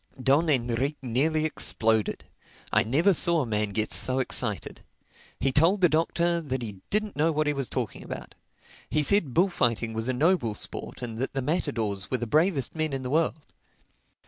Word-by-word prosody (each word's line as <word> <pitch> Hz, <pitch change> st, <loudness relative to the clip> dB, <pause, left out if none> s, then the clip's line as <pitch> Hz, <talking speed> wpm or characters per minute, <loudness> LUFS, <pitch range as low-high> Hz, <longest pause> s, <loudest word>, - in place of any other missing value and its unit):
Don 140 Hz, +6 st, +2 dB
Enrique 130 Hz, +2 st, 0 dB
nearly 155 Hz, +6 st, 0 dB
exploded. 110 Hz, -7 st, 0 dB, 0.5 s
I -, -, +5 dB
never 160 Hz, -, +3 dB
saw 170 Hz, -1 st, +4 dB
a -, -, -2 dB
man 105 Hz, -2 st, -1 dB
get 110 Hz, +2 st, -2 dB
so 130 Hz, 0 st, +4 dB
excited. 120 Hz, -6 st, -1 dB, 0.6 s
He 135 Hz, -, +1 dB
told 165 Hz, +9 st, +4 dB
the 180 Hz, -, +5 dB
Doctor 170 Hz, +2 st, +1 dB
that 130 Hz, -5 st, -4 dB
he 105 Hz, -4 st, -7 dB
didn't 210 Hz, 0 st, -1 dB
know 155 Hz, +3 st, +2 dB
what 155 Hz, 0 st, 0 dB
he 150 Hz, -, +1 dB
was 135 Hz, -5 st, -4 dB
talking -, -, -4 dB
about. -, -, -8 dB, 0.6 s
He 150 Hz, -, +1 dB
said 165 Hz, -7 st, +1 dB
bullfighting 120 Hz, -, +1 dB
was 110 Hz, +1 st, -3 dB
a 130 Hz, -, 0 dB
noble 140 Hz, -, +1 dB
sport 125 Hz, -, -2 dB
and 115 Hz, -2 st, -5 dB
that 130 Hz, -, -3 dB
the 135 Hz, -1 st, -2 dB
matadors 115 Hz, -, -2 dB
were 130 Hz, -, 0 dB
the 120 Hz, -, -4 dB
bravest 155 Hz, -, +1 dB
men 155 Hz, -2 st, -2 dB
in 135 Hz, -1 st, -3 dB
the 125 Hz, -, -4 dB
world. 155 Hz, -1 st, 0 dB
135 Hz, 180 wpm, -26 LUFS, 120-160 Hz, 0.6 s, I